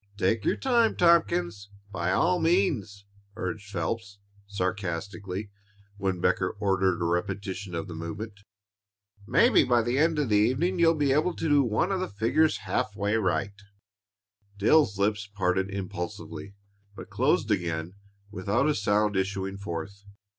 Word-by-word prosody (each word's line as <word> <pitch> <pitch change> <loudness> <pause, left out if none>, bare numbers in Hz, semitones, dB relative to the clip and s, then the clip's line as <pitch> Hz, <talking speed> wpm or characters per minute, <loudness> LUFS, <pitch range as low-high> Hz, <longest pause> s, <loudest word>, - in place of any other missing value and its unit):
"Take 100 +3 +1
your - - +2
time, 235 -4 +2
Tompkins, 100 - +2 0.2
by 90 -2 -1
all 175 - +2
means," 155 - 0 0.3
urged 100 +2 -5
Phelps, 100 +3 -4 0.3
sarcastically, 100 +1 -4 0.5
when 95 -2 -1
Becker 90 +2 +1
ordered 95 -3 +1
a 85 - -1
repetition 95 +1 -3
of 85 +5 -4
the 90 - -7
movement. 100 +6 -6 0.9
"Maybe - - +5
by 120 -2 +2
the 120 +4 0
end 160 +1 +2
of 145 -5 0
the 105 - +4
evening 135 - +1
you'll 165 -1 +5
be 145 -3 +1
able 155 +5 +1
to - - -2
do 145 -2 +5
one 115 - 0
of 190 - 0
the 185 - -2
figures 115 +10 +1
half 125 -5 -1
way 105 +1 0
right." 100 -1 0 1.0
Dale's 105 0 +3
lips 100 0 0
parted 95 -1 -1
impulsively, 100 0 -6 0.4
but - - -10
closed - - +1
again 85 0 -1 0.4
without 105 +8 0
a 155 - +3
sound 105 -2 +1
issuing 95 0 -2
forth. 100 +1 -6
100 Hz, 145 wpm, -27 LUFS, 95-125 Hz, 1.0 s, Maybe